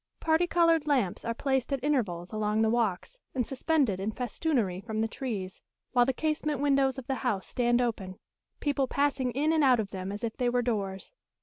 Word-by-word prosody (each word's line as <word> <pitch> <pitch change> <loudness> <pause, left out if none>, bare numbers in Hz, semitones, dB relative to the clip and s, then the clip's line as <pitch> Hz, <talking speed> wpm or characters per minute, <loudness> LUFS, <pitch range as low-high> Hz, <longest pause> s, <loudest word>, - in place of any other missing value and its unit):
Parti 325 +2 +2
coloured 330 -3 +3
lamps 250 -11 +1
are 230 - -2
placed 265 0 0
at 270 -2 -1
intervals 205 -12 -1
along 215 0 +1
the 220 - +2
walks, 235 - -1 0.2
and 250 -2 +1
suspended 270 - +1
in 200 +3 -2
festoonery 235 - -1
from 220 -1 -2
the 225 - +1
trees, 215 -7 -5 0.3
while 245 -1 +4
the - - +3
casement 305 0 -1
windows 275 -2 +2
of 265 - -6
the 270 - -1
house 215 -7 -1
stand 240 -1 +1
open, 200 -6 -2 0.4
people 280 -2 0
passing 280 -2 +1
in 300 +4 +1
and 315 -2 +3
out 255 -3 +5
of 205 -3 -3
them 190 0 -5
as 205 +3 -6
if 225 -2 -2
they 245 -2 +1
were 245 0 +1
doors. 200 - -3
245 Hz, 200 wpm, -29 LUFS, 215-280 Hz, 0.4 s, out